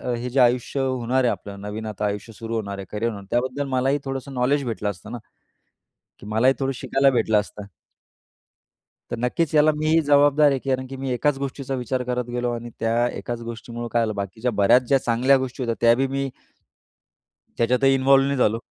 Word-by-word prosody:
हे 120 +1 -4
जे 130 +2 0
आयुष्य 125 +2 +2
होणार 130 -1 0
आहे 120 - +3
आपलं 100 -1 -7
नवीन 105 +2 -6
आता 105 -1 -3
आयुष्य 105 +2 -4
सुरू 115 +1 -5
होणार 100 -3 -3
आहे, 100 - -7
करियर 110 +2 -1
होणार 100 -2 -9
त्याबद्दल 130 +4 -1
मलाही 135 +2 +1
थोडंसं 135 0 -5
नॉलेज 135 +3 +1
भेटलं 110 -3 -2
असतं 100 +3 -8
ना? 120 - -4 1.0
की - - -12
मलाही 115 +5 +3
थोडं 135 -1 -1
शिकायला 135 +2 +2
भेटलं 110 -4 +2
असतं. 105 0 -9 1.5
तर - - -2
नक्कीच 125 +7 -1
याला 150 +1 +5
मी 155 +1 -1
ही 165 0 +5
जबाबदार 145 +1 +5
आहे. 135 - 0
कारण 130 -1 0
की 135 - -8
मी 135 -1 -4
एकाच 135 +3 +1
गोष्टीचा 135 0 -4
विचार 125 0 -2
करत 125 0 -2
गेलो 120 0 -1
आणि 120 0 -6
त्या 115 +2 +1
एकाच 120 -1 -5
गोष्टीमुळे 115 +1 -6
काय 120 - +2
झालं 110 -2 -1
बाकीच्या 105 +5 -3
बऱ्याच 110 +6 +5
ज्या 135 - +4
चांगल्या 125 +4 +3
गोष्टी 130 0 -4
होत्या 115 -1 -1
त्या 115 0 +6
बी 135 +2 0
मी 135 0 -2 1.3
त्याच्यातही 125 +3 +3
इन्वॉल्व 135 0 +4
नाही 140 0 -1
झालो 115 -2 +2
125 Hz, 195 wpm, -23 LUFS, 115-135 Hz, 1.5 s, त्या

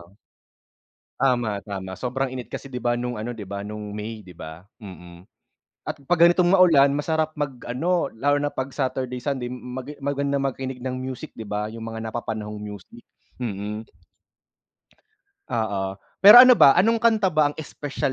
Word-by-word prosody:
oo. 85 +4 -18 1.0
Tama, 120 -6 +1
tama. 95 -1 -7
Sobrang 130 +1 -2
init 125 -2 -6
kasi - - -7
'di 125 - -4
ba, 120 0 0
no'ng 120 -2 -4
ano 120 +2 -5
'di 105 - -7
ba, 100 +1 -6
no'ng 105 0 -7
May 105 +1 -6
'di 90 - -13
ba, 80 +1 -10 0.2
mm. 90 -2 -12 0.5
At - - -5
'pag 170 +1 +2
ganitong 175 0 +2
maulan 150 -7 +5
masarap 155 +1 -1
mag-ano, 145 +4 -1
lalo 145 +5 +1
na 145 - -1
'pag 140 -2 -4
Saturday 130 -2 -3
Sunday, 125 -2 -3
mag 125 +2 -7
maganda 140 0 -1
makinig 135 -1 -3
ng 130 0 -4
music 130 -1 -6
'di - - -8
ba, 105 0 -3
'yung 110 +1 -8
mga 115 0 -6
napapanahong 110 -2 -5
music, 105 +3 -10 0.4
mm. 105 -1 -4 1.7
Oo. 100 -3 -2 0.2
Pero 205 +4 +10
ano 250 +1 +11
ba, 140 - +7
anong 225 +4 +3
kanta 220 -5 +3
ba 155 -1 +3
ang 145 - -9
espesyal 145 -2 -4
125 Hz, 160 wpm, -24 LUFS, 105-140 Hz, 1.7 s, ano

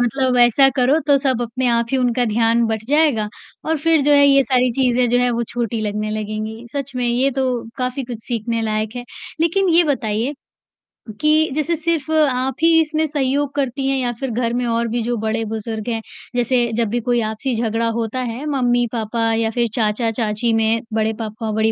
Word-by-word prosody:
मतलब 250 +1 +1
ऐसा 240 +3 +5
करो 265 +4 +3
तो 285 -1 +5
सब 260 -3 0
अपने 240 +2 -2
आप 235 -1 +1
ही 265 - +1
उनका 245 -1 +1
ध्यान 230 +1 +2
बँट 220 -1 -3
जाएगा 290 -8 +2 0.4
और 320 - +2
फ़िर 320 +1 +3
जो 290 +1 +3
है 285 0 +6
ये 275 -1 +5
सारी 255 -1 +2
चीज़ें 250 -1 +2
जो 245 +1 +2
हैं, 245 0 +2
वो 235 0 -1
छोटी 235 -2 -2
लगने 210 0 -2
लगेंगी, 215 +2 -5
सच 275 -2 -5
में 245 - 0
ये 255 +3 +2
तो 255 -2 -1 0.2
काफ़ी 255 +1 -2
कुछ 235 -2 -8
सीखने 230 -1 -2
लायक 215 +1 -2
है, 245 - -5 0.4
लेकिन 365 +4 +2
ये 345 +1 +6
बताइए 225 +4 -2 0.9
कि 310 +1 +3
जैसे 310 +3 0
सिर्फ़ 320 -2 -2
आप 265 -5 +1
ही 330 0 +6
इसमें 315 0 +1
सहयोग 280 -1 -1
करती 270 -1 -1
हैं 270 0 +1
या 250 -2 0
फ़िर 270 - -3
घर 235 0 -1
में 245 0 -1
और 230 0 0
भी 235 +1 -2
जो 240 +1 -1
बड़े-बुज़ुर्ग 220 0 -3
हैं, 225 -1 -2 0.3
जैसे 245 -1 +1
जब 230 0 +1
भी 240 +3 -1
कोई 240 +1 +1
आपसी 235 +4 -2
झगड़ा 225 0 0
होता 230 +2 -2
है, 250 +3 -4
मम्मी-पापा 240 -4 0
या 225 0 +1
फ़िर 235 +1 0
चाचा-चाची 225 0 0
में, 225 0 +2
बड़े 220 0 +1
पापा-बड़ी 220 0 -1
240 Hz, 195 wpm, -19 LUFS, 225-270 Hz, 0.9 s, है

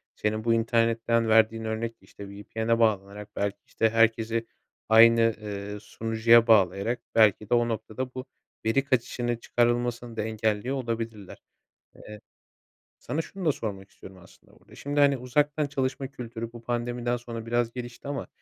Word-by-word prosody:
senin 110 +1 -2
bu 115 0 +2
internetten 115 0 +1
verdiğin 110 0 +4
örnek 110 +1 -3
işte 100 -1 -12
VPN'e 110 +3 -2
bağlanarak 105 -2 0
belki 100 0 -2
işte 110 - +1
herkesi 115 0 +1 0.4
aynı, 115 0 +6
ııı, 105 0 -6
sunucuya 115 +2 +3
bağlayarak 100 +2 +3 0.2
belki 110 -2 +4
de - - +1
o 120 -1 +3
noktada 115 +3 -4
bu 130 0 -6 0.4
veri 115 +5 +2
kaçışını 120 -2 -1
çıkarılmasını 120 0 0
da - - 0
engelliyor 110 +3 -1
olabilirler. 115 -5 -5 0.6
Eee, 105 -1 -11 0.8
sana 150 +7 -3
şunu 190 +3 -8
da 155 - +5
sormak 100 -6 -6
istiyorum 95 0 -14
aslında 90 - -20
burda. - - -18
Şimdi 145 +1 -3
hani 140 -1 +5
uzaktan 145 +4 0
çalışma 135 -1 -2
kültürü 115 -3 -7
bu 120 - -10
pandemiden 120 0 -2
sonra 115 -2 -7
biraz 120 0 0
gelişti 120 +1 -8
ama 140 -1 -4
115 Hz, 145 wpm, -27 LUFS, 110-120 Hz, 0.8 s, aynı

